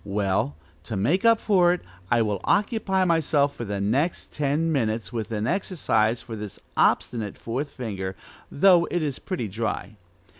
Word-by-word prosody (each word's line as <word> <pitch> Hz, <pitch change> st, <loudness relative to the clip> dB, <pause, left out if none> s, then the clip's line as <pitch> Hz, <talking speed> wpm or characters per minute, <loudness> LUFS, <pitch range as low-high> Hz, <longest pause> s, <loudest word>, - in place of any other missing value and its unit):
Well, 100 Hz, -7 st, 0 dB, 0.3 s
to 105 Hz, -, -4 dB
make 145 Hz, -, +1 dB
up 230 Hz, -1 st, +6 dB
for 180 Hz, -5 st, +4 dB
it, 180 Hz, -, -4 dB, 0.3 s
I 120 Hz, -1 st, +3 dB
will 105 Hz, -3 st, -2 dB
occupy 200 Hz, -3 st, +1 dB
myself 150 Hz, -4 st, +2 dB
for 120 Hz, -, -5 dB
the 100 Hz, -1 st, -3 dB
next 130 Hz, -, 0 dB
ten 150 Hz, +3 st, 0 dB
minutes 115 Hz, -5 st, -1 dB
with 115 Hz, -1 st, -4 dB
an 105 Hz, -1 st, -1 dB
exercise 120 Hz, -, 0 dB
for 115 Hz, -2 st, -7 dB
this 105 Hz, -2 st, -7 dB, 0.2 s
obstinate 110 Hz, -4 st, +1 dB
fourth 130 Hz, +6 st, -3 dB
finger, 100 Hz, -8 st, -5 dB, 0.4 s
though 175 Hz, +1 st, +5 dB
it 175 Hz, -2 st, -1 dB
is 145 Hz, -4 st, -3 dB
pretty 170 Hz, -, -3 dB
dry. 105 Hz, 0 st, -4 dB
120 Hz, 160 wpm, -25 LUFS, 105-170 Hz, 0.4 s, up